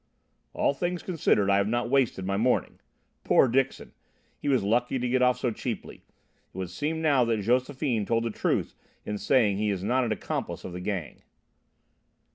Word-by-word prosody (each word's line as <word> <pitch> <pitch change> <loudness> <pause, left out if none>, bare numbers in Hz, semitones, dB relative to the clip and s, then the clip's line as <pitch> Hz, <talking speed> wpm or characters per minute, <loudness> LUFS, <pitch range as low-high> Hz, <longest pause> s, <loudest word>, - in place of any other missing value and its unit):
"All - - +1
things 175 +4 -3
considered, 150 - +1
I 100 - +4
have 100 0 +1
not 120 +2 0
wasted 125 -7 +1
my 100 +1 -1
morning. 120 +5 0 0.4
Poor - - +5
Dixon! 135 +2 -1 0.5
He - - -2
was 130 -6 +2
lucky 120 +5 +1
to 125 0 -1
get 130 +1 +1
off 125 0 +4
so 125 - -1
cheaply. - - -5
It - - -23
would 95 -2 -4
seem 160 - -2
now 140 -5 +4
that 115 -3 0
Josephine 125 -1 0
told 115 0 +1
the 115 - -2
truth - - -1 0.3
in 105 -1 -3
saying 105 -3 +3
he 105 0 0
is 95 -2 -2
not 130 +5 +2
an 115 - -1
accomplice 110 - -4
of 90 - -7
the 90 - -6
Gang." 90 -4 -4
120 Hz, 185 wpm, -27 LUFS, 105-130 Hz, 0.5 s, Poor